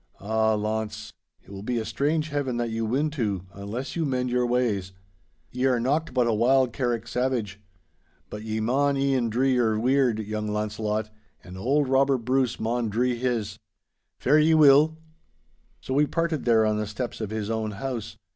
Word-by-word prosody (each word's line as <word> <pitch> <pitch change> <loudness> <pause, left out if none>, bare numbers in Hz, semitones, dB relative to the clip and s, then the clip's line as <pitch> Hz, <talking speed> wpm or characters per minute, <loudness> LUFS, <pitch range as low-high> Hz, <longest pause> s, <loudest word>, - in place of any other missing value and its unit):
'Ah, 110 +1 +1
Launce, 110 0 -3 0.3
it - - -16
will 95 -1 -7
be 120 +3 -2
a 110 - -2
strange 155 +5 -1
Heaven 140 -4 -2
that 120 -1 -2
you 115 0 -2
win 145 +7 0
to, 105 - -2
unless 105 +7 -6
you 165 - 0
mend 125 -3 -1
your 125 0 +1
ways. 110 -7 0 0.6
Ye 125 +1 -1
are 125 -2 +3
nocht 145 +6 0
but 125 -1 +2
a 115 - +1
wild 125 +2 +3
Carrick 120 -3 -2
savage. 120 -6 -2 0.7
But 105 - -7
ye 110 0 -3
maun 140 +5 +1
e'en 135 -4 +1
dree 130 +4 +2
your 115 -3 +2
weird, 125 -1 +2
young 105 0 -4
Launcelot, 105 0 -2 0.3
and 90 0 -11
auld 135 +9 +1
Robert 135 -2 +2
Bruce 130 0 +1
maun 115 +1 -1
dree 120 +4 +1
his. 115 -4 -2 0.6
Fare 150 +4 +3
ye 160 +1 +4
weel.' 155 +1 +6 0.8
So 130 - -4
we 145 +2 +3
parted 165 -3 -1
there 115 -2 +4
on 105 0 +1
the 105 0 -2
steps 115 +2 -5
of 110 - -3
his 110 0 -3
own 110 -1 -1
house. 115 +1 -5
120 Hz, 180 wpm, -25 LUFS, 110-135 Hz, 0.8 s, weel